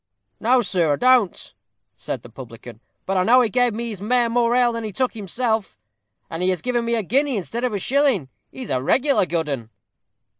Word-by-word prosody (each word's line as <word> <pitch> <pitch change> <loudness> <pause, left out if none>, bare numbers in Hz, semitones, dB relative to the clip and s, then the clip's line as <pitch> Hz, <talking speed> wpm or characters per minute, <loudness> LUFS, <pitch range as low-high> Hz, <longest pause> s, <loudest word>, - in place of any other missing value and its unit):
"No, 245 +2 +3
sir, 180 -6 +1
I - - +1
don't," 250 - +2 0.4
said 125 - -6
the 120 - -12
publican. 115 -1 -11 0.3
"But 195 0 -1
I 185 - +3
know 250 +5 +5
he 235 - +1
gave 245 -2 +2
his 225 -4 -4
mare 240 +2 +1
more 240 0 +2
ale 245 -1 +3
than 230 0 -4
he 215 - -4
took 255 +6 -1
himself, 220 - -2 0.5
and 165 +1 -6
he 180 - +1
has 185 -2 -2
given 245 -1 0
me 235 0 0
a 225 - 0
guinea 270 +5 +1
instead 205 - -4
of 250 - 0
a 205 - -2
shilling. 255 - +1 0.2
He's 255 -4 -7
a 130 - 0
regular 265 - +2
good 165 -2 -1
'un." 125 -6 -4
225 Hz, 210 wpm, -21 LUFS, 175-245 Hz, 0.5 s, know